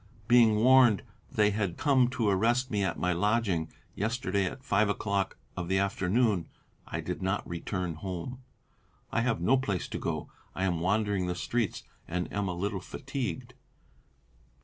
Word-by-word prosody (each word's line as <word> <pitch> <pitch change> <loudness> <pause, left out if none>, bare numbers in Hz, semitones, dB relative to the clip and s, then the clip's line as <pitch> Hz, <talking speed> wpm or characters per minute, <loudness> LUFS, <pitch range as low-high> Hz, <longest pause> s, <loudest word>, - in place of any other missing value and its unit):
Being 115 -3 +6
warned 120 -2 +6 0.3
they 105 -1 +3
had 100 -4 -1
come 135 -5 +4
to 120 -3 -1
arrest 120 +6 +2
me 105 -2 +1
at 95 -3 -1
my 90 0 +1
lodging, 100 -3 +1 0.2
yesterday 100 -3 0
at 130 +8 -5
five 105 -2 +2
o'clock 100 -1 -1 0.2
of 90 - -4
the 95 +1 +2
afternoon, 100 0 +1 0.4
I - - -3
did - - -4
not 95 +2 -1
return 90 +1 -3
home. 95 +9 -6 0.7
I 115 - +1
have 115 -7 0
no 130 +10 +4
place 105 -9 -2
to - - -4
go - - -2
to; - - -21 0.2
I 95 - -2
am 90 -3 +1
wandering 100 +1 +1
the 90 - -1
streets 115 +3 -1 0.2
and 90 +1 -3
am 100 -1 -1
a 90 - -2
little 95 +1 -2
fatigued." 130 +1 -5
100 Hz, 165 wpm, -29 LUFS, 90-120 Hz, 0.7 s, Being